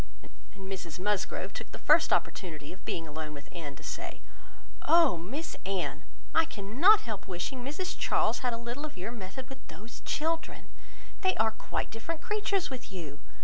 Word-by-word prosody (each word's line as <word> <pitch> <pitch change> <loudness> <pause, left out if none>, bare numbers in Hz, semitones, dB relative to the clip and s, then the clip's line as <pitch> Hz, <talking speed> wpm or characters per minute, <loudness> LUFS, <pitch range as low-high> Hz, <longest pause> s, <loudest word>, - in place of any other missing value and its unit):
And 195 -1 -8
Mrs 185 -4 -4
Musgrove 205 0 0
took - - -6
the - - -6
first - - +6
opportunity 155 -6 0
of 190 - -14
being 165 -1 -2
alone 155 0 -4
with 140 0 -9
Anne, 150 -5 -5
to - - -13
say, - - -4 0.7
"Oh! 335 - +7
Miss 240 - -4
Anne, 190 -2 -1 0.3
I 325 - +7
cannot 285 - +6
help 215 -5 -5
wishing 195 +8 -3
Mrs 300 +8 -2
Charles - - +3
had 250 -2 +1
a 230 - -1
little 240 +5 -4
of 305 -9 -5
your 185 +6 -3
method 235 +3 -6
with 270 -1 -9
those 225 +4 -10
children. 325 +2 -1 0.5
They 375 -1 +4
are 220 0 +4
quite 220 - -3
different 305 +9 -3
creatures 405 -5 +1
with 255 -4 -6
you! 160 -7 -6
220 Hz, 175 wpm, -31 LUFS, 180-290 Hz, 0.7 s, Oh